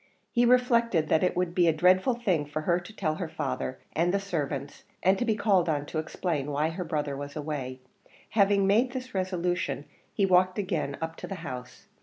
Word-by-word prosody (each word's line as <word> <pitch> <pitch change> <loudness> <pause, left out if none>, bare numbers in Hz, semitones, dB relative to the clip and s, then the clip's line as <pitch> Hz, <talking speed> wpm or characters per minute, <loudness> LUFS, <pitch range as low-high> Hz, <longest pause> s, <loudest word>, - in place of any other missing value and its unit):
He 240 -1 +3
reflected 235 -9 +3
that 160 - +4
it 180 - +1
would 180 -1 0
be 175 -1 +3
a - - +6
dreadful 185 - +3
thing 185 -11 0
for 155 +1 -4
her 170 +2 +2
to 175 +4 -11
tell 155 -7 -1
her 175 -4 -4
father 130 -3 -3 0.2
and 170 +2 +2
the 200 - +1
servants, 145 -7 -4 0.2
and 190 +2 +5
to 245 - 0
be 220 -2 +2
called 200 -5 +2
on 145 -2 0
to 155 - -3
explain 155 -2 -2
why 150 +2 +1
her 175 +3 -4
brother 150 -4 -2
was 140 +1 -7
away; 140 -4 -4 0.5
having 200 -2 +4
made 230 +6 +3
this 255 -1 -6
resolution 180 -5 -1 0.3
he 200 - +1
walked 185 0 +3
again 180 -8 -2
up 160 0 -4
to - - -7
the 195 - -5
house. 125 -1 -7
175 Hz, 205 wpm, -28 LUFS, 150-195 Hz, 0.5 s, a